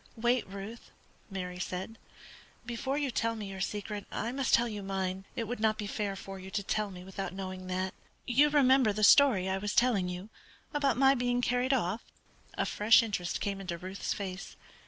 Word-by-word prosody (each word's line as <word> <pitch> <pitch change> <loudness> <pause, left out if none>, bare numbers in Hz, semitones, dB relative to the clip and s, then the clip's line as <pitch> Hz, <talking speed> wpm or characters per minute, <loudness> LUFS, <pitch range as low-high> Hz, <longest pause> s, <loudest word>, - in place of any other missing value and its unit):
"Wait, 240 +1 +1
Ruth," 200 +4 -8 0.4
Mary 180 -2 -5
said; 190 +4 -4 0.7
"before 255 +4 -2
you 285 -3 0
tell 230 0 0
me 210 -3 -6
your 190 -1 -6
secret 205 +1 -3
I 235 - -2
must 265 0 -1
tell 240 +1 +5
you 210 -3 -5
mine. 190 -1 -3
It 230 - -2
would 245 +1 -4
not 215 0 +2
be 210 - -3
fair 205 -1 -2
for 195 0 -8
you 190 0 -9
to 200 +1 -2
tell 210 +1 -1
me 180 -2 -9
without 190 0 -5
knowing 185 -1 -6
that. 185 0 -2 0.3
You 275 +5 +4
remember 265 -6 +5
the 215 +1 -2
story 230 -6 +6
I 190 0 0
was 205 +1 -3
telling 225 -7 +3
you 180 +4 -6 0.4
about 280 -5 +2
my 270 +1 +6
being 245 -1 0
carried 245 +1 +1
off?" 220 -4 +1 0.5
A - - 0
fresh 220 +3 +5
interest 190 -6 -2
came 200 -1 -2
into 175 -3 -4
Ruth's 185 +3 -5
face. 195 -1 -5
210 Hz, 195 wpm, -31 LUFS, 190-240 Hz, 0.7 s, story